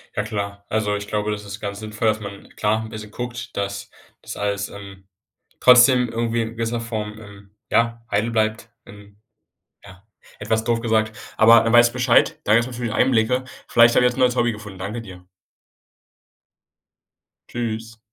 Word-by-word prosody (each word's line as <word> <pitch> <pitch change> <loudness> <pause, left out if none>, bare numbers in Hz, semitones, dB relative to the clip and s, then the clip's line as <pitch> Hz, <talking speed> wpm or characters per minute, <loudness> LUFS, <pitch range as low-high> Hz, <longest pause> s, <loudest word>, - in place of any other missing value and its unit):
Ja 105 - 0
klar. 100 -1 -5
Also 105 -1 0
ich 100 0 -5
glaube, 105 0 -2
das 105 0 -5
ist 100 +1 -8
ganz 100 -1 -5
sinnvoll, 110 +1 -3
dass 110 0 +1
man, 100 -1 -9
klar, 110 +1 0
'n 110 - -8
bisschen 110 -1 -9
guckt, 120 0 -7
dass 100 0 -4 0.3
das - - -8
alles, 100 0 -2
ähm, 100 -1 -12 0.5
trotzdem 125 0 +6
irgendwie 115 0 -1
in 110 - -4
gewisser 115 +1 -2
Form, 110 -2 -5
ähm, 100 -2 -14 0.2
ja, 115 0 +1
heil 105 +3 0
bleibt, 110 -1 -1
wenn 100 0 -15 0.7
ja, 95 -1 -15 0.4
etwas 110 0 -1
doof 115 0 0
gesagt. 110 -2 0 0.2
Aber 115 +1 +7
dann 115 0 0
weiß 120 0 +7
ich 120 - -7
Bescheid, 125 -1 +2
da 105 - +2
gibt's 115 +2 +3
natürlich 120 -2 -4
Einblicke. 125 0 +2 0.2
Vielleicht 115 0 +5
habe 125 - +4
ich - - +5
jetzt 125 - -10
'n - - -4
neues 125 -1 +3
Hobby 120 -1 +2
gefunden. 105 -3 -10
Danke 105 +5 -5
dir. 90 -5 -12 2.2
Tschüss. 115 -1 -5
110 Hz, 175 wpm, -22 LUFS, 105-115 Hz, 2.2 s, Aber